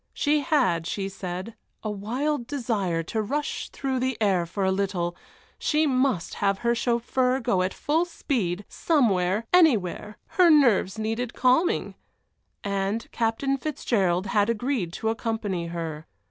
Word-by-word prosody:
She 295 +1 +2
had, 255 - +1
she 195 +1 -2
said, 190 +2 -6 0.3
a 215 - -2
wild 240 +6 -2
desire 215 -11 -1
to 220 +7 -2
rush 285 +8 -3
through 265 -2 -2
the 260 -2 -1
air 190 -5 +2
for 195 +3 -2
a 190 - +2
little 190 -3 -1 0.4
she 310 0 +2
must 260 - +1
have 200 -1 +2
her 235 - +4
chauffeur 250 +2 +1
go 195 -7 +1
at 185 +1 0
full 320 - 0
speed 210 - -2
somewhere 210 - +1
anywhere 215 - +3
her 360 -2 +5
nerves 240 - +4
needed 225 +2 -2
calming! 320 - +2 0.7
And 200 +2 -2
Captain 235 +4 0
Fitzgerald 205 - 0
had 205 +2 +2
agreed 230 -5 -1
to 220 - -2
accompany 220 -6 -2
her. 165 -2 -5
225 Hz, 140 wpm, -26 LUFS, 190-260 Hz, 0.7 s, her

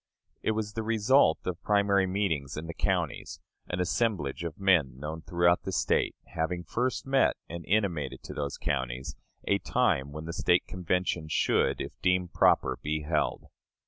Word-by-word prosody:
It 110 - +1
was 105 -1 -3
the 115 - -2
result 110 - +3
of 90 -1 -3
primary 100 0 +3
meetings 80 -8 -1
in 80 - -4
the 85 - -6
counties; - - -2 0.3
an 90 - -3
assemblage 90 - 0
of 85 0 -5
men 90 -10 +3
known 75 +3 -5
throughout 85 +1 +2
the 95 - -5
State, 80 -3 +1 0.2
having 85 +2 -2
first 125 +7 -2
met 135 0 +3
and 85 0 -7
intimated 90 -10 0
to - - -7
those 70 -1 -3
counties 65 -2 -3 0.3
a 100 - +3
time 85 - +1
when 75 +2 -7
the 85 - -5
State 90 +1 +2
Convention 90 -2 -1
should, 80 - +1
if - - -4
deemed 90 -1 +1
proper, - - +3
be 75 +1 -2
held. 75 -1 0
85 Hz, 165 wpm, -29 LUFS, 75-100 Hz, 0.3 s, result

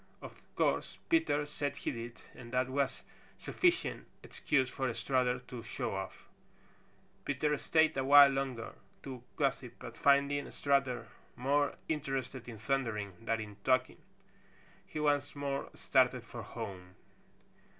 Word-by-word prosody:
Of - - -11
course - - +1
Peter 320 - +3
said 145 -1 -3
he - - -2
did, 115 -1 -7
and 120 -2 -11
that 130 0 +2
was 135 0 -1 0.3
sufficient 360 0 0 0.2
excuse 130 -4 +1
for 130 0 -2
Strutter 125 -2 +1
to 125 -1 -8
show - - -3
off. - - -6 1.0
Peter 150 +2 +1
stayed 160 +2 +3
a 135 - 0
while 140 +1 +9
longer 135 -4 -3 0.3
to 130 -3 -7
gossip, 135 -4 0
but - - -9
finding 140 0 +3
Strutter 135 -5 +1 0.3
more 140 +3 +1
interested 135 -4 -3
in 115 - -8
thundering 110 -4 -1
than 115 0 0
in 105 -2 -8
talking, 130 0 +2 0.9
he 155 - -5
once 145 -1 +1
more 140 -1 -2
started 125 -2 +3
for 115 +1 -8
home. 95 -5 -7
135 Hz, 130 wpm, -33 LUFS, 120-145 Hz, 1.0 s, while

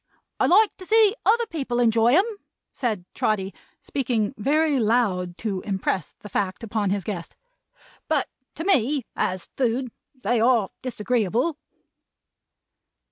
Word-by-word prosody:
I - - +3
like 420 +4 +5
to 370 - -10
see 435 -2 +5
other 470 +2 +4
people 275 - -3
enjoy 230 +1 +4
'em," 380 +5 +5 0.5
said 215 -8 -2
Trotty, 195 -2 -1 0.3
speaking 240 -6 -1
very 290 +5 +2
loud 205 -6 +1
to 195 -4 -1
impress 190 -3 -2
the - - -9
fact 195 +1 -2
upon 215 -2 -1
his 200 0 -1
guest, 175 -5 -5 0.7
"but 305 -4 +1 0.3
to 325 - -4
me, 285 - +2
as 185 -2 -2
food, 250 0 0 0.3
they 235 +3 +2
are 230 -4 +3
disagreeable." 245 - 0
235 Hz, 130 wpm, -24 LUFS, 205-285 Hz, 0.7 s, like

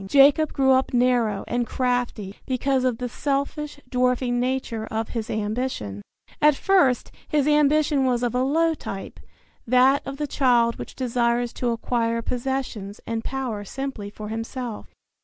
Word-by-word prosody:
Jacob 285 +5 +5
grew 265 -1 +3
up 260 -1 +2
narrow 240 -5 +2
and 240 0 -1
crafty 245 -6 -1
because 260 0 +1
of 250 -3 +1
the 250 0 -3
selfish, 285 +3 -2
dwarfing 250 -1 +1
nature 245 -3 -2
of 220 0 -3
his 225 -3 -4
ambition, 210 - -3 0.4
At 300 -1 +6
first 355 -8 +2 0.2
his 295 -2 +1
ambition 295 -1 +3
was 250 -2 +1
of 240 - 0
a 250 - +1
low 325 +5 +2
type, 195 -10 -7 0.5
that 255 +3 +5
of 275 0 -5
the 300 - -1
child 245 -4 +2
which - - -8
desires 240 -1 0
to 245 - -1
acquire 230 0 -1
possessions 245 -6 -3
and 230 0 -3
power 255 -6 -3
simply 265 -3 -5
for 210 0 -8
himself. 225 +1 -5
250 Hz, 150 wpm, -24 LUFS, 230-270 Hz, 0.5 s, At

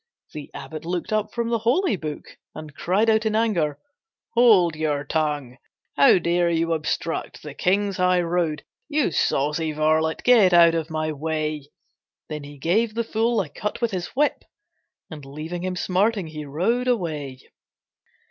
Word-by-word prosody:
The 150 -2 -8
abbot 145 +3 -7
looked 175 +5 -3
up 215 0 0
from 235 -1 -2
the 230 -1 0
holy 245 - +2
book 155 -4 -7 0.2
And 155 -1 -9
cried 190 +10 +1
out 220 0 +3
in 215 - -1
anger, 175 -11 +1 0.6
"Hold 210 -9 +5
your 150 -2 -1
tongue! 145 -4 -2 0.4
"How 140 +6 +6
dare 175 0 +1
you 165 0 +1
obstruct 160 +1 -3
the 150 -2 -8
King's 195 +5 0
highroad, 175 -3 +1 0.3
You 295 - +1
saucy 150 +2 0
varlet, 155 +1 +1
get 220 -7 +5
out 170 -1 +7
of 165 -1 -2
my 155 0 -2
way." 155 -1 -3 0.6
Then 150 -1 -5
he 145 0 -11
gave 215 +10 0
the 235 - 0
fool 225 0 0
a 165 - -6
cut 210 +8 -5
with 235 -2 0
his 180 -3 -3
whip 295 +2 +1 0.7
And 150 -2 -8
leaving 155 +6 -6
him 185 0 -2
smarting, 195 +2 0
he 155 -1 -7
rode 205 - 0
away. 155 - -2
170 Hz, 155 wpm, -23 LUFS, 155-210 Hz, 0.7 s, out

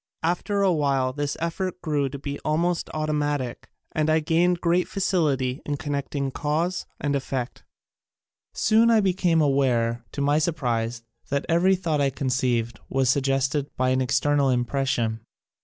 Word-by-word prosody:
After 200 +4 0
a 190 -2 +4
while 135 -4 +1
this 145 0 -3
effort 180 +2 -3
grew 145 -4 0
to 140 - -6
be 140 +1 -5
almost 170 +3 0
automatic 145 -4 -2 0.2
and 155 0 0
I 155 +1 +4
gained 170 +3 +2
great 175 +1 +1
facility 145 -9 0
in 145 -1 -3
connecting 140 -2 -3
cause 165 +6 -1
and 145 -1 0
effect. 130 -2 -3 0.9
Soon 225 +2 +3
I 225 -1 +5
became 180 -4 +2
aware, 120 -5 +1
to - - -5
my 145 +2 +3
sur 160 +2 +1
prise, 115 -4 -2 0.3
that 140 0 -1
every 180 +3 +4
thought 165 -5 -1
I 140 - +3
conceived 125 -3 -1
was 130 -2 +2
suggested 135 +1 0
by 130 0 +2
an 130 0 +2
external 135 +2 +2
impression. 120 -3 0
145 Hz, 150 wpm, -25 LUFS, 130-165 Hz, 0.9 s, I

